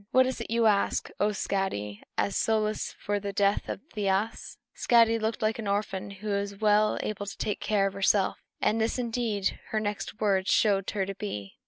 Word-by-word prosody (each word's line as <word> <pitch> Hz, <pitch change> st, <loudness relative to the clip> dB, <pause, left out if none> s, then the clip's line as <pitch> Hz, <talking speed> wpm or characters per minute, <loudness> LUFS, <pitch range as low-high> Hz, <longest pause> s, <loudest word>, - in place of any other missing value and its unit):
What 260 Hz, +1 st, +5 dB
is 255 Hz, -2 st, -3 dB
it -, -, -6 dB
you 230 Hz, 0 st, +2 dB
ask, 205 Hz, -2 st, +2 dB
O 205 Hz, -, +3 dB
Skadi, 190 Hz, -, -2 dB, 0.2 s
as 200 Hz, -, 0 dB
solace 215 Hz, -1 st, 0 dB
for 205 Hz, 0 st, -1 dB
the 200 Hz, 0 st, -4 dB
death 200 Hz, 0 st, +1 dB
of -, -, -4 dB
Thiasse?" 205 Hz, +1 st, -1 dB, 0.2 s
Skadi 230 Hz, -1 st, +4 dB
looked 220 Hz, 0 st, -1 dB
like 215 Hz, +1 st, +1 dB
an 215 Hz, -, -4 dB
orphan 200 Hz, -1 st, -1 dB
who 200 Hz, +2 st, -7 dB
was 200 Hz, 0 st, -1 dB
well 210 Hz, 0 st, +3 dB
able 205 Hz, -1 st, -4 dB
to -, -, -6 dB
take 210 Hz, -, -2 dB
care 205 Hz, -2 st, +1 dB
of 195 Hz, -, -1 dB
herself; 195 Hz, 0 st, +2 dB, 0.2 s
and 220 Hz, +1 st, +1 dB
this 225 Hz, +3 st, 0 dB
indeed 230 Hz, -5 st, -1 dB
her 215 Hz, -, 0 dB
next 210 Hz, +1 st, -4 dB
words 195 Hz, -3 st, +1 dB
showed 195 Hz, -1 st, +3 dB
her 195 Hz, -2 st, -1 dB
to 195 Hz, -, -4 dB
be. 105 Hz, -, -6 dB
205 Hz, 195 wpm, -28 LUFS, 195-220 Hz, 0.2 s, What